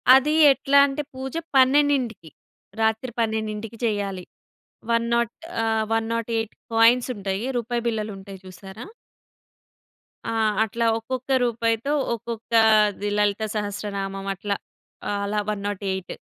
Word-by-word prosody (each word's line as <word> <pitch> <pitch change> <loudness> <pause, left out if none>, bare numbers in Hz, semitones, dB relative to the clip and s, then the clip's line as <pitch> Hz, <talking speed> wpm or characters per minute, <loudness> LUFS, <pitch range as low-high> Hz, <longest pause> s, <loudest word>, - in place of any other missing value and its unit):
అది 295 +3 +3 0.2
ఎట్లా 275 +1 +2
అంటే 275 +2 -3
పూజ 265 0 -6 0.2
12కి 260 - +3 0.5
రాత్రి 220 +3 0
12కి 220 0 -2
చేయాలి. 200 -4 -2 0.7
వన్ 230 0 +2
నాట్ 235 -1 +1 0.3
ఆహ్, 220 -1 +1
108 225 0 -1 0.2
కాయిన్స్ 235 +3 +5
ఉంటాయి. 195 +2 -3
రూపాయి 235 0 -2
బిళ్ళలుంటాయి 200 -3 -5
చూసారా! 190 +4 -10 1.4
ఆ! - - -1 0.3
అట్లా 230 +2 -2
ఒక్కొక్క 255 +3 -5
రూపాయితో 230 +3 0 0.2
ఒక్కొక్క 230 0 -8 0.6
లలితా 210 +1 +1
సహస్రనామం. 200 -1 -4
అట్లా, 200 +2 -2 0.6
అలా 200 +1 -1
108. 200 -2 -4
225 Hz, 100 wpm, -24 LUFS, 205-235 Hz, 1.4 s, కాయిన్స్